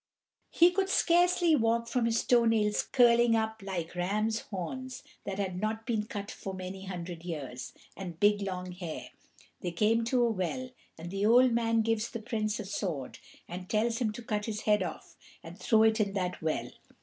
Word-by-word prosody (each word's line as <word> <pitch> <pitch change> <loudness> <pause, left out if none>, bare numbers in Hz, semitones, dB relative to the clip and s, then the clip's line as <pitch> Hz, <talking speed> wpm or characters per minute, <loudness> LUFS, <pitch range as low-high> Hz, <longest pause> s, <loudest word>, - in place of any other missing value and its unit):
He 345 +1 +5
could 385 +1 0
scarcely 350 -2 +4
walk 230 -2 +1
from 235 0 0
his 230 -1 +1
toe 240 -1 +4
nails 215 -2 +2
curling 235 -2 +4
up 220 -1 -1
like 180 -4 -4
ram's 210 +5 0
horns 255 +8 -6 0.2
that 195 -1 -4
had 190 -2 -2
not 220 +1 -2
been 220 -3 -1
cut 205 -2 -5
for 190 -1 -6
many 190 +1 -7
hundred 175 -2 -6
years, 140 -7 -6 0.2
and 175 -4 -7
big 205 0 +4
long 185 -2 -4
hair. 175 -3 -6 0.5
They 180 - -3
come 220 +6 +2
to 245 +1 +2
a 235 - +2
well, 245 +6 -3 0.3
and 170 +2 -8
the 195 +2 +1
old 250 +2 +6
man 230 -1 +2
gives 225 0 0
the 230 - -5
Prince 215 -1 -2
a 215 - -5
sword, 180 -9 -4 0.3
and 180 +1 -7
tells 225 +2 +1
him 230 -4 0
to 240 - -8
cut 210 -2 -2
his 215 -1 -3
head 210 -1 +3
off, - - -6 0.3
and - - -11
throw 220 -3 +4
it 220 0 +3
in 200 -2 +1
that 180 -2 -2
well. 160 -1 -2
215 Hz, 190 wpm, -30 LUFS, 185-230 Hz, 0.5 s, old